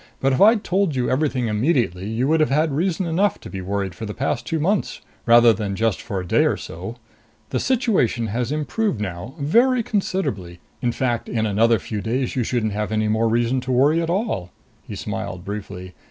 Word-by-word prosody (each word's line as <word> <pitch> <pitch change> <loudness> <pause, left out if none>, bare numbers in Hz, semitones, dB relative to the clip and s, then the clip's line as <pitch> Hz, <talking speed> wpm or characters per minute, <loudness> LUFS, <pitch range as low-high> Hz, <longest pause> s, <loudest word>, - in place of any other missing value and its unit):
"But 135 0 +2
if 130 - 0
I'd 215 +1 +6
told 185 -4 0
you 125 -1 0
everything 130 -2 0
immediately, 105 - 0
you 115 +4 0
would 160 +2 +3
have 155 - +3
had 155 +3 +2
reason 175 +5 0
enough 180 +4 +1
to - - -10
be 95 - -5
worried 95 0 -2
for 110 +6 -7
the 105 - -6
past 135 +3 -2
two 165 - -1
months, 195 +6 0 0.3
rather 120 0 +7
than 105 -3 -3
just 110 0 0
for 100 - -4
a 90 - -5
day - - +3
or - - +1
so. 95 +8 -7 0.6
The - - 0
situation 215 - +1
has 115 +4 -2
improved 155 - -1
now, 105 - -5
very 235 - +3
considerably. 110 - -2 0.2
In 120 - +1
fact, 120 -2 -2
in 110 -2 0
another 110 +2 +3
few 105 +1 -5
days 125 +4 -2
you 125 - +1
shouldn't 110 -3 -1
have 105 +1 -2
any 110 0 0
more 110 +1 +2
reason 120 +3 +1
to 130 - -4
worry 145 +6 +3
at 165 - -2
all." 175 - -1 0.4
He - - -6
smiled 95 -2 -5
briefly. 100 -3 -6
120 Hz, 205 wpm, -22 LUFS, 105-155 Hz, 0.6 s, rather